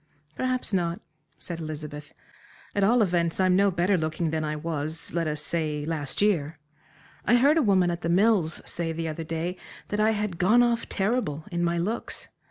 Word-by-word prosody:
"Perhaps 255 -3 -1
not," 170 -2 0 0.4
said 170 -2 -6
Elizabeth, 150 -2 -6 0.6
"at 200 - +1
all 230 +3 +5
events, 170 -3 0
I'm 185 -1 +4
no 200 +1 +4
better 180 +1 +1
looking 155 +1 -1
than 160 -1 -1
I 155 0 -2
was 155 0 -3
let 165 -1 0
us 150 -1 -2
say, 155 -3 -1
last 155 +2 -2
year. 160 -7 +1 0.7
I 240 - +5
heard 280 +5 +5
a - - +4
woman 190 -7 +3
at 170 - -4
The 170 - -2
Mills 185 -2 +3
say 170 -1 -2
the 165 0 -3
other 160 +1 -4
day 165 +3 -3 0.3
that 205 - -2
I 215 +1 +4
had 210 -5 -3
"gone 220 +7 +5
off 235 -1 0
terrible," 195 - -1
in 175 0 -1
my 170 0 +1
looks. 205 +7 -3
170 Hz, 185 wpm, -26 LUFS, 160-205 Hz, 0.7 s, all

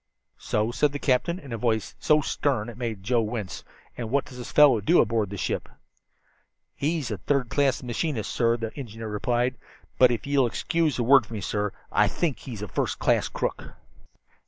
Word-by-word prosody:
"So?" 105 +2 0
said 145 +3 +1
the - - -2
captain, 145 +6 +1
in 140 -9 -9
a 115 - -4
voice 110 -2 0
so 150 -1 +4
stern 130 -6 -1
it 120 - -10
made 110 -6 -4
Joe 120 +3 +2
wince. 105 -3 -4 0.3
"And 115 -2 -5
what 140 +3 +1
does 130 -3 -11
this 120 - -7
fellow 140 -7 +6
do 170 - +4
aboard 110 -4 +2
the 100 - -6
ship?" - - -2 1.0
"He's 150 -4 -2
a 105 - -3
third 135 +3 0
class 140 -2 +1
machinist, 120 -2 -2
sir," 115 -1 +2
the 115 -1 -5
engineer 115 -5 -7
replied. 120 +4 0 0.4
"But 125 - +8
if 120 -2 -2
ye'll 140 -3 +3
excuse 160 +5 0
a 120 - 0
word 130 -2 +5
from 115 - -7
me, 105 - -4
sir, 105 0 -1 0.2
I - - +4
think 165 -7 -1
he's 115 -6 -7
a - - -4
first - - -2
class - - +2
crook." - - -4
120 Hz, 195 wpm, -26 LUFS, 110-140 Hz, 1.0 s, But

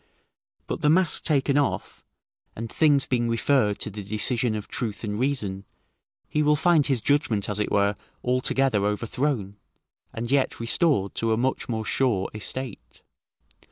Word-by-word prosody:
But - - -4
the 150 - +3
mask 175 +1 +4
taken 145 -2 +2
off, 145 - -2 0.5
and 115 0 -6
things 145 -3 +3
being 120 -2 0
referred 115 -3 +2
to - - -3
the 105 +1 -7
decision 110 +3 0
of 105 - -5
truth 110 -3 -4
and 105 -1 -3
reason, 110 -8 -1 0.6
he 150 - 0
will 150 0 +4
find 160 -1 +3
his 130 -6 0
judgment 140 -8 +1
as 105 0 -1
it 105 - -1
were 100 0 +2 0.3
altogether 125 -3 +1
overthrown, 105 +1 -1 0.6
and 115 +2 -5
yet 140 -1 +1
restored 115 - +1
to 115 -1 0
a - - 0
much 130 +2 -1
more 110 -2 -2
sure 110 -6 0
estate. 120 +2 -6
120 Hz, 155 wpm, -25 LUFS, 105-140 Hz, 0.6 s, mask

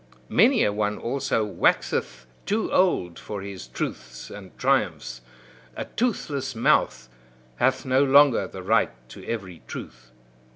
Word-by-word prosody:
Many 240 +6 +4
a 105 - +1
one, 105 0 -1
also, 125 -3 -1
waxeth 65 -10 0 0.2
too 215 +2 -1
old 90 - +2
for 100 -2 -6
his 100 -2 -8
truths - - -6
and - - -11
triumphs; 60 -1 0 0.5
a - - -4
toothless 140 - -2
mouth 65 - +2 0.5
hath 130 +1 +1
no 130 +1 +3
longer 140 -1 +5
the 95 - -9
right 110 +4 +3 0.2
to - - -11
every 95 -7 -5
truth. 60 -1 -9
115 Hz, 130 wpm, -25 LUFS, 95-140 Hz, 0.5 s, longer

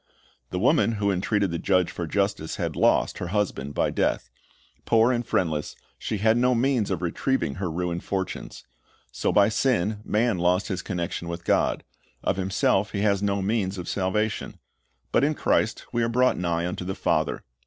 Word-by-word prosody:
The 90 - -3
woman 120 - +3
who 100 -2 0
entreated 100 0 0
the 85 - -2
judge 90 -2 +2
for 85 - -4
justice 100 -3 -1
had - - -3
lost, - - +2
her 90 - -3
husband 85 -8 -2
by - - +1
death. - - -1 0.5
Poor 115 +2 +4
and 120 -1 0
friendless, 80 -9 -1 0.2
she 110 - -3
had 110 +3 +3
no 125 +1 +3
means 120 -3 +1
of 90 -2 -2
retrieving 85 - -1
her 90 - -1
ruined 85 +1 -3
fortunes. 95 -2 -4 0.5
So - - -1
by 100 0 +5
sin, 110 -3 +1
man 110 -2 +1
lost 90 +4 +1
his 95 -3 -2
connection 85 -2 -4
with 85 0 -6
God. - - +1 0.4
Of - - 0
himself 95 +2 +1
he 100 - -1
has 100 -2 +2
no 100 -1 0
means 100 -2 0
of 90 - -6
salvation. 105 +3 -1 0.5
But - - +3
in 150 +2 +2
Christ 110 - 0
we 120 - 0
are 115 - +1
brought 125 +2 +3
nigh 85 -1 -1
unto 90 +1 -4
the 95 +1 -4
Father. - - 0
100 Hz, 180 wpm, -25 LUFS, 90-110 Hz, 0.5 s, by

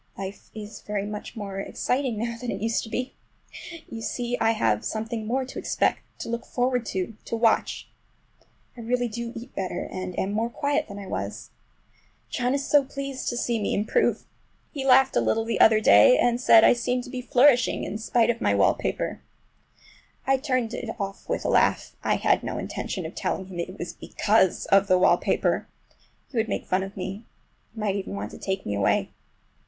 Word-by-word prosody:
Life 195 +1 -7
is 215 0 -8
very 205 -1 -3
much 210 +3 -7
more 200 -3 -5
exciting 250 +3 -1
now 235 +2 -2
than 240 +1 -6
it 195 - -3
used 225 +2 0
to - - -10
be. 250 +3 -3 0.7
You 225 - -7
see 245 +1 -2
I 225 - +4
have 110 - +1
something 220 0 -3
more 260 +3 0
to 260 - -7
expect, - - +1 0.2
to - - -5
look 235 0 -3
forward 250 -1 -1
to, 190 +3 -3
to - - -3
watch. 225 -1 +1 0.9
I - - -12
really 245 +1 0
do 235 +1 -5
eat 240 +3 -9
better, 185 -2 -3
and 185 -1 -5
am 195 - -1
more 225 +3 0
quiet 285 +4 -1
than 200 - -8
I 200 - -7
was. - - -5 0.8
John 250 +1 0
is 280 0 -2
so 290 -1 +5
pleased 275 -1 -4
to 240 - -3
see 235 -2 0
me - - 0
improve! 220 - +1 0.5
He 280 -4 -4
laughed 265 +1 +5
a - - +4
little 225 0 +1
the 230 - -1
other 220 -1 +7
day, - - +7
and 240 0 +2
said 225 -3 +7
I - - +7
seemed 245 +1 -1
to 250 - -10
be 255 - -4
flourishing 250 0 +4
in 210 - -4
spite 230 +1 +2
of 235 0 -7
my - - +2
wallpaper. - - 0 1.0
I 270 0 +3
turned 255 -4 -1
it 235 - -5
off 195 -1 -5
with - - -2
a - - +1
laugh. - - +2
I - - +2
had - - +2
no - - -4
intention - - -4
of - - -6
telling 190 - -2
him 185 -2 -8
it 185 +3 -5
was 175 - -5
because 205 -4 +1
of 195 0 +5
the 185 -1 +5
wallpaper—he 185 +7 -1
would 225 -1 +1
make - - -2
fun 185 0 +1
of 195 +1 -7
me. 195 +3 -5 0.5
He - - -8
might 205 -2 0
even 200 0 -4
want - - -5
to - - -11
take 190 0 -3
me 105 - -2
away. 100 -1 +1
225 Hz, 200 wpm, -25 LUFS, 200-250 Hz, 1.0 s, other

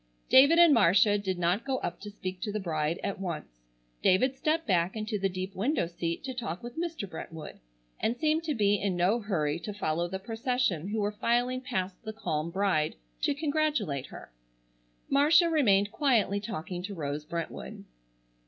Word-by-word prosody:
David 280 +6 +7
and 340 -3 +8
Marcia 205 -1 +5
did 190 -2 -2
not 175 +5 +1
go 265 -1 -1
up 175 - -4
to 210 - -8
speak 185 -3 -6
to 210 - -2
the 215 - -2
bride 160 -3 -1
at 195 - -3
once. 155 - -6 0.4
David 255 +8 +3
stepped 320 +3 0
back 180 -2 +1
into 215 -1 -3
the 195 0 +1
deep 185 +1 -5
window 240 - +1
seat 170 0 -4
to 265 -1 -4
talk 230 -8 -5
with 240 0 -7
Mr. 330 -10 -3
Brentwood, 160 -2 -8 0.4
and 235 +2 0
seemed 310 +3 +1
to 305 -3 -1
be 205 -3 +3
in 195 -3 0
no 185 +7 +2
hurry 170 -8 -1
to 205 +3 -6
follow 170 -3 -1
the 190 +2 -4
procession 225 - -1
who 215 +2 -2
were 205 0 0
filing 245 +4 0
past 190 -8 -3
the 220 -1 -5
calm 155 -7 -2
bride 185 -4 +1 0.3
to - - +1
congratulate 290 - 0
her. - - -11 0.8
Marcia 310 +5 +5
remained 205 -10 +3
quietly 225 -9 +2
talking 180 -4 -5
to 200 +2 -6
Rose 150 -2 -3
Brentwood. 170 +2 -6
205 Hz, 180 wpm, -29 LUFS, 175-250 Hz, 0.8 s, and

